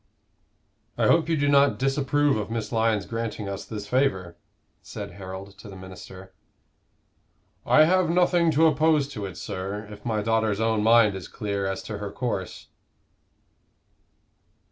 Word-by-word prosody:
"I -, -, +2 dB
hope 165 Hz, -1 st, +3 dB
you 165 Hz, -, +2 dB
do 145 Hz, 0 st, +1 dB
not 140 Hz, 0 st, +4 dB
disapprove 140 Hz, +1 st, +1 dB
of 105 Hz, -1 st, -3 dB
Miss 110 Hz, -2 st, -4 dB
Lyon's 110 Hz, -3 st, +1 dB
granting 115 Hz, -2 st, -4 dB
us 100 Hz, 0 st, -5 dB
this 105 Hz, -2 st, -6 dB
favor?" 100 Hz, -9 st, 0 dB, 0.5 s
said 100 Hz, +4 st, -8 dB
Harold 95 Hz, +1 st, -9 dB
to 105 Hz, -, -11 dB
the 95 Hz, -, -10 dB
minister. 95 Hz, 0 st, -11 dB, 1.3 s
"I 155 Hz, -, +6 dB
have 180 Hz, +1 st, +3 dB
nothing 175 Hz, -1 st, +3 dB
to 160 Hz, +3 st, +4 dB
oppose 155 Hz, -2 st, +3 dB
to 105 Hz, -8 st, -5 dB
it, 95 Hz, -, -10 dB
sir, 100 Hz, +3 st, -5 dB
if 105 Hz, 0 st, -11 dB
my 110 Hz, -3 st, -1 dB
daughter's 110 Hz, -2 st, +1 dB
own 110 Hz, -1 st, +1 dB
mind 110 Hz, -1 st, +5 dB
is 95 Hz, -2 st, -7 dB
clear 100 Hz, -2 st, -3 dB
as 95 Hz, -, -4 dB
to 105 Hz, -2 st, -6 dB
her 105 Hz, -1 st, -5 dB
course." 100 Hz, -7 st, -4 dB
110 Hz, 150 wpm, -25 LUFS, 100-140 Hz, 1.3 s, I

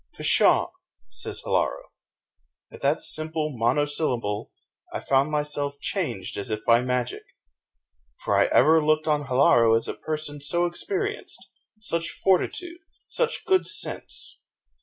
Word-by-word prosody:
"Pshaw!" -, -, +4 dB, 0.4 s
says -, -, -4 dB
Hilaro. -, -, -1 dB, 0.8 s
At -, -, -12 dB
that 140 Hz, +3 st, +1 dB
simple 155 Hz, -2 st, -2 dB
mono 120 Hz, +6 st, +2 dB
syllable 125 Hz, -9 st, -2 dB, 0.4 s
I -, -, -3 dB
found 135 Hz, +2 st, +2 dB
myself 145 Hz, -1 st, -2 dB
changed 155 Hz, -, -3 dB
as 100 Hz, -, -4 dB
if 110 Hz, -1 st, -4 dB
by 115 Hz, +1 st, +5 dB
magic! 125 Hz, -1 st, -2 dB, 1.0 s
for -, -, -1 dB
I -, -, +5 dB
ever 160 Hz, +3 st, +4 dB
looked 155 Hz, 0 st, +2 dB
on 150 Hz, -2 st, +1 dB
Hilaro 120 Hz, -3 st, +4 dB
as 115 Hz, -, -4 dB
a -, -, -3 dB
person 155 Hz, -2 st, -4 dB
so 170 Hz, +5 st, +1 dB
experienced 405 Hz, -, -4 dB, 0.3 s
such 170 Hz, -5 st, -2 dB
fortitude, 335 Hz, -, 0 dB, 0.3 s
such 475 Hz, -1 st, -1 dB
good 375 Hz, -1 st, +2 dB
sense. 420 Hz, -, -6 dB
150 Hz, 130 wpm, -25 LUFS, 125-165 Hz, 1.0 s, by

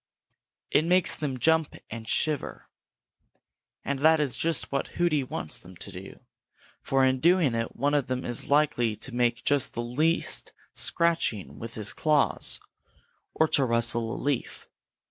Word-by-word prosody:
It 155 Hz, -, +4 dB
makes 180 Hz, +1 st, +2 dB
them 140 Hz, -4 st, -3 dB
jump 160 Hz, +4 st, +2 dB, 0.2 s
and 110 Hz, 0 st, -7 dB
shiver, 150 Hz, -3 st, -1 dB, 1.2 s
and 140 Hz, -1 st, -2 dB
that 160 Hz, +2 st, +5 dB
is 145 Hz, -4 st, 0 dB
just 165 Hz, -2 st, 0 dB
what 140 Hz, -, -1 dB
Hooty 165 Hz, -5 st, +2 dB
wants 80 Hz, -10 st, -6 dB
them 90 Hz, +1 st, -14 dB
to 100 Hz, -, -8 dB
do, 95 Hz, +1 st, -10 dB, 0.6 s
for 135 Hz, -1 st, +2 dB
in 130 Hz, 0 st, +1 dB
doing 170 Hz, -3 st, +3 dB
it 115 Hz, 0 st, -3 dB
one 145 Hz, +1 st, 0 dB
of 145 Hz, -4 st, +1 dB
them 130 Hz, 0 st, -3 dB
is 120 Hz, -1 st, -1 dB
likely 140 Hz, -6 st, +2 dB
to 130 Hz, -, -5 dB
make 120 Hz, 0 st, 0 dB
just 145 Hz, -3 st, +1 dB
the 120 Hz, -, -2 dB
least 155 Hz, +8 st, +1 dB, 0.2 s
scratching 170 Hz, -, 0 dB
with 115 Hz, 0 st, -7 dB
his 110 Hz, -2 st, -2 dB
claws, 150 Hz, -2 st, +1 dB, 0.8 s
or 160 Hz, -, +3 dB
to 140 Hz, -, +3 dB
rustle 115 Hz, -1 st, +2 dB
a -, -, -6 dB
leaf. 140 Hz, -3 st, -3 dB
135 Hz, 155 wpm, -27 LUFS, 115-155 Hz, 1.2 s, that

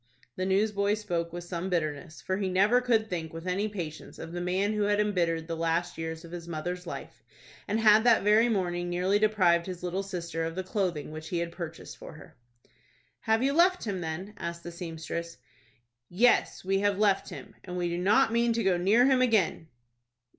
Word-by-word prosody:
The 185 Hz, -, -2 dB
newsboy 200 Hz, +1 st, +2 dB
spoke 175 Hz, -6 st, -3 dB
with 175 Hz, +1 st, -6 dB
some 175 Hz, +1 st, -4 dB
bitterness, 155 Hz, -2 st, -3 dB
for 185 Hz, -, -1 dB
he 195 Hz, -2 st, -1 dB
never 200 Hz, +7 st, +4 dB
could 230 Hz, -3 st, +2 dB
think 165 Hz, -5 st, -4 dB
with 165 Hz, +1 st, -8 dB
any 190 Hz, +3 st, 0 dB
patience 175 Hz, -7 st, -7 dB
of 165 Hz, -, -8 dB
the 175 Hz, 0 st, -4 dB
man 190 Hz, +4 st, 0 dB
who 210 Hz, -, -1 dB
had 205 Hz, 0 st, +2 dB
embittered 170 Hz, -6 st, 0 dB
the 165 Hz, -, -3 dB
last 165 Hz, +1 st, -1 dB
years 160 Hz, +1 st, -5 dB
of 165 Hz, -, -12 dB
his 170 Hz, -1 st, -7 dB
mother's 175 Hz, +2 st, -4 dB
life, -, -, -8 dB, 0.5 s
and 215 Hz, +2 st, 0 dB
had 215 Hz, -1 st, +6 dB
that 235 Hz, -4 st, +4 dB
very 215 Hz, +3 st, +4 dB
morning 175 Hz, -4 st, -1 dB
nearly 185 Hz, +3 st, +1 dB
deprived 185 Hz, -5 st, +3 dB
his 180 Hz, -1 st, -7 dB
little 180 Hz, +2 st, -2 dB
sister 170 Hz, -4 st, -4 dB
of 165 Hz, 0 st, -3 dB
the 185 Hz, -, -3 dB
clothing 180 Hz, -6 st, -2 dB
which 155 Hz, +1 st, -8 dB
he 175 Hz, -, -2 dB
had 170 Hz, 0 st, -2 dB
purchased 170 Hz, -2 st, -8 dB
for -, -, -10 dB
her. 155 Hz, -, -14 dB, 0.8 s
"Have 220 Hz, +2 st, +1 dB
you 275 Hz, +1 st, +2 dB
left 360 Hz, +3 st, +4 dB
him, 195 Hz, -5 st, -3 dB
then?" 175 Hz, +5 st, -5 dB
asked 170 Hz, -1 st, -5 dB
the 175 Hz, -, -7 dB
seamstress. 170 Hz, 0 st, -6 dB, 0.7 s
"Yes, 225 Hz, 0 st, +2 dB
we 195 Hz, +1 st, +1 dB
have 200 Hz, -1 st, +1 dB
left 200 Hz, -2 st, +2 dB
him, -, -, -10 dB
and 180 Hz, -1 st, -6 dB
we 175 Hz, -1 st, 0 dB
do 170 Hz, 0 st, -2 dB
not 210 Hz, +4 st, +3 dB
mean 235 Hz, 0 st, +2 dB
to 230 Hz, -, -1 dB
go 190 Hz, -2 st, +3 dB
near 205 Hz, +8 st, +4 dB
him 260 Hz, -1 st, +4 dB
again." 215 Hz, -9 st, +2 dB
180 Hz, 205 wpm, -28 LUFS, 170-210 Hz, 0.8 s, had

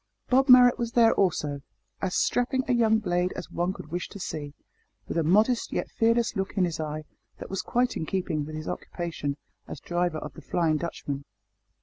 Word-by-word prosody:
Bob 265 Hz, +2 st, +4 dB
Marrot 250 Hz, 0 st, +8 dB
was 235 Hz, -1 st, -2 dB
there 230 Hz, -2 st, +5 dB
also 150 Hz, -7 st, 0 dB, 0.4 s
as 190 Hz, -2 st, -1 dB
strapping 255 Hz, +2 st, +1 dB
a 255 Hz, -, +2 dB
young 225 Hz, -2 st, +4 dB
blade 180 Hz, -4 st, 0 dB
as -, -, -7 dB
one 175 Hz, +2 st, 0 dB
could 155 Hz, -5 st, -10 dB
wish 175 Hz, +1 st, -3 dB
to -, -, -9 dB
see, 145 Hz, -5 st, -5 dB, 0.5 s
with -, -, -4 dB
a 165 Hz, -, +2 dB
modest 215 Hz, +9 st, +3 dB
yet -, -, -3 dB
fearless 230 Hz, +1 st, +2 dB
look 195 Hz, +1 st, -3 dB
in 185 Hz, -, +4 dB
his 170 Hz, -2 st, -4 dB
eye, 155 Hz, 0 st, -4 dB, 0.3 s
that -, -, -9 dB
was 195 Hz, -, -1 dB
quite 245 Hz, +1 st, 0 dB
in 160 Hz, -, -3 dB
keeping 170 Hz, -5 st, -1 dB
with 155 Hz, +1 st, -7 dB
his 155 Hz, 0 st, -6 dB
occupation 160 Hz, -5 st, -4 dB, 0.3 s
as -, -, -7 dB
driver 175 Hz, -2 st, -1 dB
of 150 Hz, -2 st, -7 dB
the -, -, -11 dB
"Flying 165 Hz, -3 st, +1 dB
Dutchman." 145 Hz, -3 st, -4 dB
180 Hz, 200 wpm, -27 LUFS, 155-230 Hz, 0.5 s, Marrot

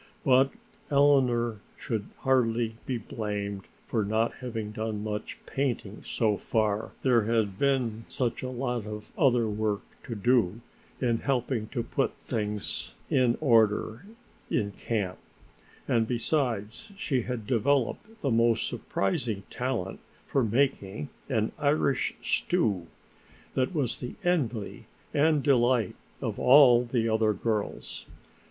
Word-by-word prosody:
But 130 Hz, 0 st, +5 dB, 0.4 s
Eleanor 130 Hz, -6 st, +3 dB, 0.2 s
should 110 Hz, -4 st, -3 dB
hardly 120 Hz, -3 st, +2 dB
be 130 Hz, -, 0 dB
blamed 105 Hz, -3 st, -4 dB, 0.2 s
for 110 Hz, -3 st, 0 dB
not 110 Hz, +3 st, +1 dB
having 115 Hz, -4 st, -4 dB
done 110 Hz, -1 st, -3 dB
much 105 Hz, 0 st, -4 dB
painting 120 Hz, -7 st, -2 dB
so 110 Hz, -3 st, +1 dB
far, 110 Hz, 0 st, 0 dB
there, 120 Hz, -5 st, +4 dB
had 110 Hz, -3 st, 0 dB
been 125 Hz, -5 st, +1 dB
such 120 Hz, -3 st, -1 dB
a 130 Hz, -, -3 dB
lot 125 Hz, -3 st, -2 dB
of 105 Hz, 0 st, -7 dB
other 120 Hz, -4 st, +3 dB
work 105 Hz, -1 st, -1 dB, 0.2 s
to 115 Hz, -, -4 dB
do, 115 Hz, -1 st, +2 dB, 0.4 s
in 120 Hz, -3 st, +1 dB
helping 125 Hz, -4 st, -1 dB
to 120 Hz, 0 st, -3 dB
put 135 Hz, +3 st, 0 dB
things 105 Hz, -3 st, -3 dB, 0.2 s
in 125 Hz, -2 st, +3 dB
order 115 Hz, -, +2 dB, 0.4 s
in 105 Hz, -3 st, 0 dB
camp, 100 Hz, -3 st, -3 dB, 0.7 s
and 115 Hz, -2 st, +2 dB
besides 120 Hz, -, -1 dB
she 135 Hz, -10 st, 0 dB
had 120 Hz, -2 st, -4 dB
developed 140 Hz, -, 0 dB
the 135 Hz, -, 0 dB
most 115 Hz, 0 st, +3 dB
surprising 100 Hz, +1 st, -1 dB
talent 125 Hz, -7 st, -2 dB, 0.3 s
for 135 Hz, -, +1 dB
making 110 Hz, -, 0 dB, 0.2 s
an 110 Hz, 0 st, +1 dB
Irish 145 Hz, -2 st, +1 dB
stew, 95 Hz, -6 st, +1 dB, 0.7 s
that 130 Hz, +7 st, 0 dB
was 135 Hz, -6 st, 0 dB
the 125 Hz, -, -6 dB
envy 125 Hz, -, -1 dB, 0.3 s
and 150 Hz, -1 st, +3 dB
delight 125 Hz, -6 st, +3 dB, 0.3 s
of -, -, -2 dB
all 125 Hz, -3 st, +7 dB
the 120 Hz, -1 st, 0 dB
other 110 Hz, -1 st, +2 dB
girls. 105 Hz, +1 st, -3 dB
115 Hz, 125 wpm, -28 LUFS, 105-130 Hz, 0.7 s, all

